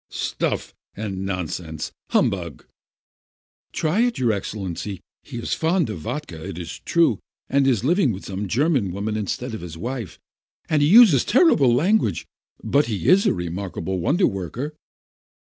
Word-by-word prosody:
"Stuff - - -2 0.2
and 100 -3 -4
nonsense! 85 -3 -4 0.2
Humbug 85 -8 0
!" - - -50
"Just - - -5
try 160 +6 +2
it, 245 0 +1
your 120 -3 +2
Excellency! 100 -2 -4 0.2
He - - -9
is 115 - -2
fond 165 - +1
of 95 - -6
vodka, 85 - -6
it 95 -2 -6
is 85 -3 -7
true, 170 -1 +2 0.3
and 140 0 +2
is 120 -5 +2
living 170 - +3
with 95 -1 -7
some 100 +1 -4
German 130 - +1
woman 105 +3 -3
in 105 -2 -2
stead 125 +4 -3
of 110 - -5
his 85 -2 -8
wife, 120 -2 -5 0.5
and 155 -2 +2
he 145 - +4
uses 195 - +7
terrible 235 - +4
language, 145 - +2 0.4
but 145 +1 +2
he 105 -4 -3
is 190 +3 +5
a - - +3
remarkable 90 +1 -4
wonder 165 - +2
worker." 100 - -3
110 Hz, 160 wpm, -23 LUFS, 95-150 Hz, 0.5 s, uses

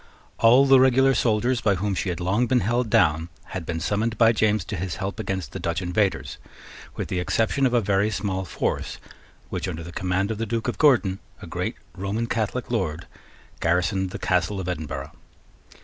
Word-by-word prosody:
All 125 +4 +6
the 135 -1 +7
regular 130 +1 +5
soldiers 120 +1 +1
by 100 -3 +2
whom 100 +2 -1
she 95 - -2
had 85 - -3
long 100 +7 +1
been 125 0 +2
held 120 +3 0
down 80 -3 +3 0.2
had 90 -4 -6
been 80 -1 -2
summoned 110 +6 -1
by 115 0 +6
James 105 -4 +1
to 105 - -4
his 90 0 -3
help 95 +2 -4
against 95 -4 -3
the - - -6
Dutch 85 0 -1
invaders, 95 +2 -1 0.6
with - - -4
the 90 - -2
exception 115 +9 +1
of 125 - -2
a 120 - +4
very 100 +1 +2
small 95 -2 -2
force, 90 - -3 0.5
which, - - -3
under 80 - -5
the 85 - -8
command 95 +3 -1
of 110 - -4
the 115 - -2
Duke 115 +2 -2
of 120 - -3
Gordon, 110 -11 +4 0.2
a - - -9
great - - -3 0.2
Roman 100 +5 -2
Catholic 115 +2 -2
Lord, 90 -8 -1 0.5
garrisoned 90 +3 +1
the - - -6
Castle 95 +1 0
of 95 - -4
Edinburgh. 75 -5 -4
100 Hz, 195 wpm, -24 LUFS, 90-115 Hz, 0.6 s, the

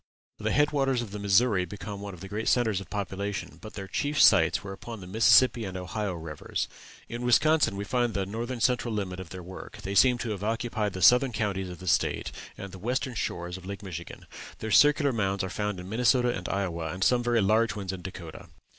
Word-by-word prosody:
The - - -1
head 150 +2 +3
waters 135 -4 +1
of 110 - -9
the 105 - -5
Missouri 100 0 +3
became 100 +2 -7
one 100 -2 -6
of 85 - -15
their 95 - -8
great 105 +2 -3
centres 110 -6 +2
of 90 - -11
population; 100 0 -4
but 110 - -10
their 95 -2 -6
chief 145 +9 -1
sites - - +5
were 100 -1 -6
upon 115 +3 -8
the 95 - -9
Mississippi 115 +4 +5
and 95 -2 -5
Ohio 90 +2 -3
rivers. 80 -2 -4 0.4
In 120 +1 -6
Wisconsin 145 +1 +3
we 100 - -3
find 120 +1 0
the 100 -1 0
northern 115 +4 -4
central 125 -2 +1
limit 95 -3 -3
of 95 -3 -8
their 90 0 -8
work; 95 +2 -10
they 100 - -3
seem 125 +5 +5
to 120 -2 -3
have 100 -2 -4
occupied 110 -2 -1
the 95 - -3
southern 125 +6 +6
counties 100 -4 -2
of 90 - -8
the 95 - -10
State, 85 - +1 0.3
and 100 -1 -7
the 95 - -10
western 125 +5 -2
shores 90 -5 -3
of 95 - -12
Lake 100 +1 -6
Michigan. 85 -3 -8 0.3
Their 110 - -5
circular 145 +2 +5
mounds 100 -3 0
are 95 - -4
found 105 -2 -2
in 90 - -8
Minnesota 125 +3 +3
and 90 - -5
Iowa, 85 -5 -2
and 95 +2 -3
some 125 +3 +4
very 120 -1 +2
large 110 +3 +2
ones 95 -2 -4
in 95 - -7
Dakota. 90 -3 -9
100 Hz, 225 wpm, -28 LUFS, 95-120 Hz, 0.4 s, southern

